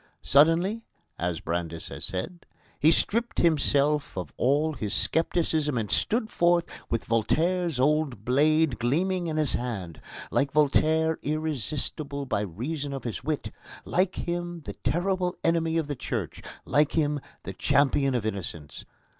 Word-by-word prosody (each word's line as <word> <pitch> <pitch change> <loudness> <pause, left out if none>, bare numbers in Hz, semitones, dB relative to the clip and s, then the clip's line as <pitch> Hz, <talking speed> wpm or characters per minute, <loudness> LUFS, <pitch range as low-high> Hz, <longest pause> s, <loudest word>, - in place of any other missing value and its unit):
"Suddenly," 165 +10 +4 0.4
as 85 -1 -2
Brandes 85 -1 -3
has - - -6
said, 95 - -5 0.3
"he 155 - +5
stripped 230 +8 +1
himself 145 - +2
of 90 -5 -5
all 145 +5 +2
his 110 -6 -3
scepticism 160 -3 +1
and 110 -3 -2
stood 220 -1 +1
forth, 170 0 +3 0.2
with 115 - -1
Voltaire's 165 +7 +1
old 140 -6 +1
blade 150 +2 +3
gleaming 175 +9 0
in 155 -1 -2
his 155 -3 +2
hand 100 -10 -4 0.3
like 140 -1 +1
Voltaire 155 +2 +3
irresistible 150 -1 -3
by 125 -6 -1
reason 135 - -4
of 135 -3 -5
his 120 0 -4
wit, 150 +1 -2 0.3
like 185 +1 +1
him 175 0 -3
the - - -7
terrible 180 +1 -1
enemy 165 -1 +2
of 165 - +1
the 145 0 -4
Church, - - -4 0.2
like 150 0 +2
him 150 -2 +1 0.2
the - - -6
champion 135 -1 +2
of 115 -3 -1
innocence. 85 -8 -5
150 Hz, 140 wpm, -27 LUFS, 125-165 Hz, 0.4 s, he